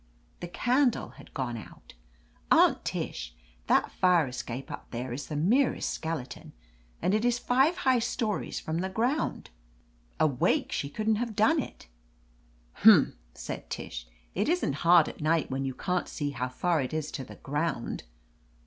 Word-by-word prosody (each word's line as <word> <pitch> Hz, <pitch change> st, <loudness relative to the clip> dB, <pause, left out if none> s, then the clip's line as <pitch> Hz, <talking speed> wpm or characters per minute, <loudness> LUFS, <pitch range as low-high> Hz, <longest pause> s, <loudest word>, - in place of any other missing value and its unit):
The 175 Hz, -, -5 dB
candle 245 Hz, +7 st, +1 dB
had -, -, -15 dB
gone 125 Hz, -3 st, -2 dB
out. 110 Hz, -, -12 dB, 0.6 s
Aunt -, -, +5 dB
Tish, -, -, -4 dB, 0.3 s
that -, -, +3 dB
fire 180 Hz, -4 st, +3 dB
escape 125 Hz, 0 st, -6 dB
up -, -, -8 dB
there 120 Hz, +1 st, -4 dB
is 140 Hz, +4 st, -5 dB
the 150 Hz, -, -5 dB
merest 230 Hz, -, +2 dB
skeleton, 160 Hz, -6 st, -5 dB, 0.5 s
and 185 Hz, -, +2 dB
it 215 Hz, +1 st, +2 dB
is 240 Hz, 0 st, +2 dB
five 265 Hz, +7 st, +2 dB
high 260 Hz, -2 st, +3 dB
stories 230 Hz, -2 st, -2 dB
from 160 Hz, +1 st, -3 dB
the 190 Hz, +2 st, -2 dB
ground. 240 Hz, +10 st, -1 dB, 0.7 s
Awake, 140 Hz, -5 st, +2 dB
she 140 Hz, -, -2 dB
couldn't 215 Hz, +7 st, 0 dB
have 230 Hz, -1 st, -3 dB
done 220 Hz, +10 st, +4 dB
it." -, -, -10 dB, 0.9 s
"Humph!" -, -, +7 dB, 0.2 s
said -, -, -7 dB
Tish. -, -, -6 dB, 0.3 s
"It -, -, 0 dB
isn't 345 Hz, -, +1 dB
hard 170 Hz, -2 st, +6 dB
at -, -, -8 dB
night, 160 Hz, 0 st, +1 dB
when 135 Hz, +1 st, -1 dB
you 130 Hz, -1 st, -3 dB
can't 180 Hz, -1 st, -1 dB
see 145 Hz, -1 st, -3 dB
how 125 Hz, -1 st, -3 dB
far 165 Hz, +5 st, +1 dB
it 130 Hz, +4 st, -3 dB
is 155 Hz, -1 st, -3 dB
to 135 Hz, -, -5 dB
the 130 Hz, -, -11 dB
ground." 145 Hz, -3 st, -2 dB
165 Hz, 160 wpm, -29 LUFS, 135-225 Hz, 0.9 s, Humph